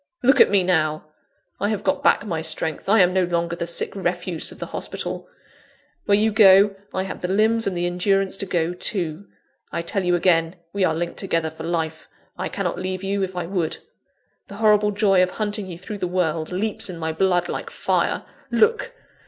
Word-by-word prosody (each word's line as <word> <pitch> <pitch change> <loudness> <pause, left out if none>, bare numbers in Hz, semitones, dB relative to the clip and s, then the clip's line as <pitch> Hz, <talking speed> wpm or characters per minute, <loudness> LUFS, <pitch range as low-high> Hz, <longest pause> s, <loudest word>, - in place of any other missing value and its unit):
Look 265 +2 +6
at - - +7
me 200 -2 +3
now! 155 -4 +1 0.5
I 205 - 0
have 215 -2 -2
got - - 0
back - - +3
my 165 -6 -2
strength; 160 +1 -3
I 220 0 +6
am 180 0 +4
no 190 0 +3
longer 170 -1 -1
the 170 - -4
sick 170 - -1
refuse 175 -2 -1
of - - -12
the - - -5
hospital. - - -5 0.8
Where 200 - +4
you 220 +1 +2
go, 200 -1 +6 0.2
I 190 - -1
have 190 - -7
the 180 - -2
limbs 220 +4 +2
and 185 -3 -2
the 175 - 0
endurance 195 +2 +1
to 195 - -3
go 170 -1 0
too! 180 -1 -3 0.4
I 170 - -3
tell 195 +3 -2
you 180 0 +2
again, 170 -1 +2 0.2
we 200 -1 0
are 160 -3 +2
linked 170 +1 -3
together 165 -4 -1
for 160 0 -8
life; 160 -2 -3 0.3
I - - -4
cannot - - -3
leave 185 +1 -4
you 195 +1 -1
if 190 -1 -3
I 180 -1 -2
would. 175 -3 -2 0.7
The 200 - -10
horrible 210 -1 +4
joy 200 -2 +3
of 185 - +3
hunting 210 0 -3
you 175 -2 -7
through 205 +3 -7
the 180 - -1
world, 165 -3 -1
leaps 200 +2 -2
in 180 - -6
my 160 -1 -2
blood 175 +1 +1
like - - -4
fire! - - 0 0.3
Look! 455 - +2
185 Hz, 205 wpm, -22 LUFS, 170-200 Hz, 0.8 s, at